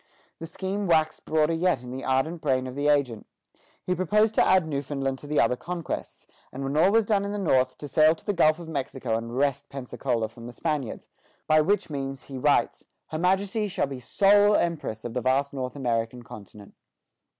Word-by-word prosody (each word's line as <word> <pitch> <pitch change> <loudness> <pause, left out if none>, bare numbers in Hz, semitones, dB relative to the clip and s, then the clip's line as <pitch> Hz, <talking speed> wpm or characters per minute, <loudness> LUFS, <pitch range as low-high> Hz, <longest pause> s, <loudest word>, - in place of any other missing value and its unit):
The 165 - -6
scheme 195 +3 -3
waxed 160 -2 +1
broader 155 +1 +2
yet 170 -5 +1
in 125 - -8
the 130 +1 -6
ardent 135 +6 0
brain 130 -3 +1
of 130 - -6
the 145 +2 -1
agent; 140 -7 +1 0.6
he 180 - 0
proposed 210 +4 +2
to - - +4
add 185 -3 +3
Newfoundland 135 -2 -3
to 145 - -10
the 150 0 +1
other 115 +2 +3
conquests, 170 +4 -6 0.3
and 135 +2 -6
when 135 +1 -3
all 170 +6 +4
was 225 0 +3
done 205 -2 +1
in 200 0 -3
the - - -3
North, 130 -9 +1
to 145 - -7
sail 155 +2 +4
to - - -21
the 205 - 0
Gulf 155 -4 +4
of 170 -2 -9
Mexico 135 -6 -3
and 115 +2 -4
wrest 140 -1 0
Pensacola 125 -3 -3
from 115 +1 -12
the 120 - -9
Spaniards; 145 -3 -3 0.4
by 155 0 +4
which 190 +1 0
means, 135 -2 -4
he 135 - -8
writes, 145 +2 +1 0.3
"Her 155 - -4
Majesty 195 +4 +1
shall 195 - -1
be 135 -2 -7
sole 205 - +4
empress 150 -10 -2
of 120 - -5
the 125 - -1
vast 135 +3 +1
North 130 -1 -4
American 120 -2 -2
continent." 105 -2 -12
145 Hz, 205 wpm, -26 LUFS, 130-175 Hz, 0.6 s, to